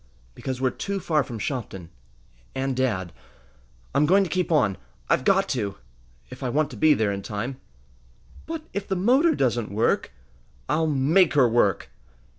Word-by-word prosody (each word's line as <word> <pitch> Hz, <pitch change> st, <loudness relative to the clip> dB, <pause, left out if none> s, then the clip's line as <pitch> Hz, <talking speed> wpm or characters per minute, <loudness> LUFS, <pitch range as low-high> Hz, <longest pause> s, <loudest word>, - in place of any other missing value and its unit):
"Because 130 Hz, -, -5 dB
we're 130 Hz, -1 st, +1 dB
too 200 Hz, +8 st, -4 dB
far 155 Hz, -5 st, +1 dB
from 120 Hz, -3 st, -7 dB
Shopton 100 Hz, -, -5 dB, 0.6 s
and 135 Hz, 0 st, -1 dB
dad! 105 Hz, -, -1 dB, 0.8 s
I'm 150 Hz, -, +3 dB
going 195 Hz, +4 st, +5 dB
to 175 Hz, -, -5 dB
keep 180 Hz, -2 st, -1 dB
on. 110 Hz, -, +2 dB, 0.3 s
I've -, -, +2 dB
got 195 Hz, +5 st, +3 dB
to 105 Hz, -7 st, -2 dB, 0.5 s
if -, -, -10 dB
I 130 Hz, -, -2 dB
want 150 Hz, +4 st, 0 dB
to -, -, -8 dB
be 155 Hz, -1 st, +4 dB
there 110 Hz, -2 st, +1 dB
in 100 Hz, 0 st, -4 dB
time!" 115 Hz, +7 st, -5 dB, 0.9 s
"But 325 Hz, -1 st, -5 dB
if 200 Hz, 0 st, -4 dB
the 190 Hz, -, -1 dB
motor 260 Hz, -, +3 dB
doesn't 120 Hz, -4 st, 0 dB
work?" 105 Hz, +4 st, 0 dB, 0.6 s
"I'll 160 Hz, 0 st, +1 dB
make 155 Hz, +5 st, +3 dB
her 135 Hz, -4 st, +6 dB
work!" 115 Hz, -5 st, +1 dB
135 Hz, 165 wpm, -25 LUFS, 115-175 Hz, 0.9 s, her